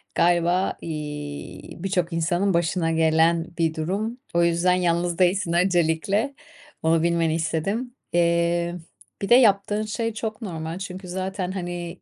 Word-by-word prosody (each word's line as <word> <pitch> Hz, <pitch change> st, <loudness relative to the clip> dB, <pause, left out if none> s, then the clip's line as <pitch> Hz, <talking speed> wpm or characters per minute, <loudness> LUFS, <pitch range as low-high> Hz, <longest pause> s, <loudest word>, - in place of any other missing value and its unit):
galiba, 175 Hz, +2 st, +2 dB
iii, 150 Hz, -2 st, -6 dB
birçok 180 Hz, -3 st, 0 dB
insanın 175 Hz, +4 st, +1 dB
başına 170 Hz, 0 st, +1 dB
gelen 160 Hz, +1 st, +3 dB
bir 165 Hz, -1 st, +1 dB
durum. 200 Hz, +9 st, -2 dB, 0.2 s
O 170 Hz, 0 st, +3 dB
yüzden 170 Hz, +2 st, +3 dB
yalnız 175 Hz, -1 st, 0 dB
değilsin 180 Hz, -1 st, +2 dB
öncelikle, 180 Hz, -, +1 dB, 0.5 s
onu 165 Hz, 0 st, +3 dB
bilmeni 165 Hz, -2 st, +2 dB
istedim. 195 Hz, +10 st, -2 dB, 0.2 s
Eee, 170 Hz, 0 st, +2 dB, 0.5 s
bir 200 Hz, -, -3 dB
de 240 Hz, -, +8 dB
yaptığın 210 Hz, -3 st, +4 dB
şey 225 Hz, +1 st, -2 dB
çok 220 Hz, +1 st, -5 dB
normal 165 Hz, -3 st, -5 dB
çünkü 185 Hz, -1 st, -7 dB
zaten, 185 Hz, 0 st, -3 dB
hani, 175 Hz, -2 st, -5 dB
175 Hz, 130 wpm, -24 LUFS, 165-195 Hz, 0.5 s, de